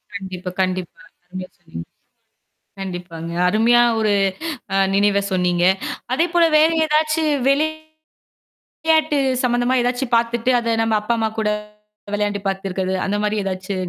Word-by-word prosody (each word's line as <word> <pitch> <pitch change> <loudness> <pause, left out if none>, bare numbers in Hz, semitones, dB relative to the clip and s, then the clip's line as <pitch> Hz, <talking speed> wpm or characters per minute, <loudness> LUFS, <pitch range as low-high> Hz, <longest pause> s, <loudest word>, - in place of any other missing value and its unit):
கண்டிப்பா, 185 -2 -6
கண்டிப்பா. 185 -2 -3 0.3
அருமையா 185 0 -8
சொன்னீங்க. 165 - -9 0.9
கண்டிப்பாங்க. 175 -3 -6 0.2
அருமையான 240 +4 +4
ஒரு 215 -2 +2 0.6
அ - - +2 0.2
நினைவ 200 0 +3
சொன்னீங்க. 180 -1 +1 0.5
அதேபோல 340 +3 +2
வேற 315 +2 +5 0.2
ஏதாச்சு 310 +1 +1 0.3
வெளி 290 +3 +3 1.2
விளையாட்டு 315 -2 +3 0.2
சம்மந்தமா 245 +1 +1
ஏதாச்சும் 245 +1 -1
பாத்துட்டு 235 +1 0
அத 230 -1 -1
நம்ம 225 -1 +1
அப்பா, 215 +3 -2
அம்மா 220 0 +1
கூட 215 -1 +1 0.7
விளையாண்டு 205 -1 -1
பாத்துருக்கது 190 -1 -2
அந்தமாரி 210 +1 -1
ஏதாச்சு 185 +1 -4
210 Hz, 115 wpm, -20 LUFS, 185-245 Hz, 1.2 s, வேற